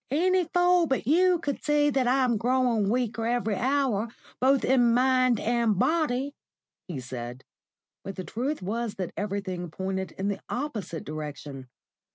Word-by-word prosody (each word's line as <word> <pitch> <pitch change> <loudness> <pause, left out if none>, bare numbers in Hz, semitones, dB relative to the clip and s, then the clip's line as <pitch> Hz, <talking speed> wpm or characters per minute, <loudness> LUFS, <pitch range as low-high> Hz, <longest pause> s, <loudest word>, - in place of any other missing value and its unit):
"Any 360 +6 +2
fool 355 0 +3
but 265 -5 -1
you 355 +6 +4
could 290 -4 -4
see 295 -1 +3
that 265 -2 +1
I'm 255 -1 +3
growing 240 -3 +1
weaker 230 -1 0
every 235 -3 0
hour, 255 -3 +1 0.3
both 265 +1 +3
in 245 -3 +4
mind 255 -2 +3
and 235 -3 +1
body," 285 - +1 0.5
he 165 -7 -5
said; 125 0 -7 0.6
but 195 - -6
the 185 - -5
truth 255 +5 -3
was 225 +3 -2
that 185 -4 -4
everything 195 -4 -3
pointed 190 +2 -4
in 195 - -3
the 200 - -2
opposite 220 - -4
direction. 145 -3 -7
235 Hz, 150 wpm, -27 LUFS, 195-275 Hz, 0.6 s, you